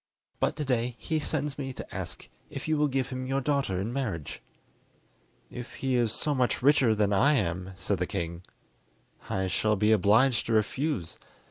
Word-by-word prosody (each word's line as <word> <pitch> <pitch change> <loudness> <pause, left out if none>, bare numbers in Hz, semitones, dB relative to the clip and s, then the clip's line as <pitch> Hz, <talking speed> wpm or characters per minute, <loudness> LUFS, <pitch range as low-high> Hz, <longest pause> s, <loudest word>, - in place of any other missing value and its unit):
But - - +1
to 150 -1 -3
day 125 -2 0
he 160 -1 -1
sends 145 -1 -2
me 135 -2 -3
to - - -9
ask - - -6 0.2
if - - -6
you 155 - +2
will 150 0 +3
give 135 -2 -1
him 130 0 -4
your 135 +1 +1
daughter 140 -9 0
in 110 +5 -3
marriage?" 105 - -3 1.1
"If 120 -1 -8
he 135 -1 -1
is 120 -3 +2
so 150 +5 -1
much 125 -2 0
richer 135 -5 +5
than 105 -1 +2
I 140 +10 +5
am," 95 - -1
said 95 0 -1
the 90 - 0
king, 85 0 -3 0.9
"I 95 0 0
shall 105 +3 +1
be 105 +2 +3
obliged 110 +5 +4
to 115 - 0
refuse. 110 - 0
120 Hz, 185 wpm, -28 LUFS, 100-135 Hz, 1.1 s, richer